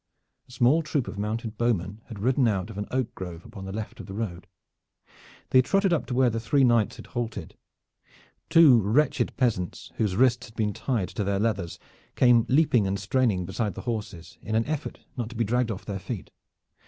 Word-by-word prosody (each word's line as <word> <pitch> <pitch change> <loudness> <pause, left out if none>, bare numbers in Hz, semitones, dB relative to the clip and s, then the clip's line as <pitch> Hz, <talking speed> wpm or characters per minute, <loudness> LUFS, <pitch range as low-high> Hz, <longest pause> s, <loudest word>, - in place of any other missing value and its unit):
A - - -15
small 130 +6 +3
troop 150 -5 -1
of 100 - -6
mounted 110 +1 -3
bowmen 105 -3 0
had 115 - -8
ridden 125 +4 +2
out 105 0 -1
of 100 - -7
an 105 - -4
oak 130 -2 -1
grove 90 -2 -8
upon 95 -4 -9
the 95 - -6
left 110 +1 -6
of - - -8
the 95 - -7
road. 95 -5 -4 1.0
They 130 - +7
trotted 195 +7 +2
up 160 - 0
to 125 - -3
where 125 -1 +4
the 115 - -2
three 135 +5 +2
knights 120 -4 +3
had - - -11
halted. 115 -8 -5 0.9
Two 150 -8 +7
wretched 140 +8 +1
peasants 105 - -1
whose 105 -4 0
wrists 125 +2 +3
had 110 - -18
been 105 -3 0
tied 110 -4 -2
to 105 - -3
their 100 0 0
leathers 100 -5 -1 0.4
came 120 -2 +5
leaping 130 -7 +3
and 95 +1 -1
straining 100 -3 +1
beside 100 +3 -2
the - - -6
horses 105 -8 -5
in 110 - -5
their 110 +1 +2
effort 150 -1 -5 0.2
not 120 -3 -3
to 120 - -11
be 115 - +1
dragged 120 +2 +1
off 100 -3 -5
their 100 -2 -4
feet. - - -6
115 Hz, 205 wpm, -26 LUFS, 100-125 Hz, 1.0 s, They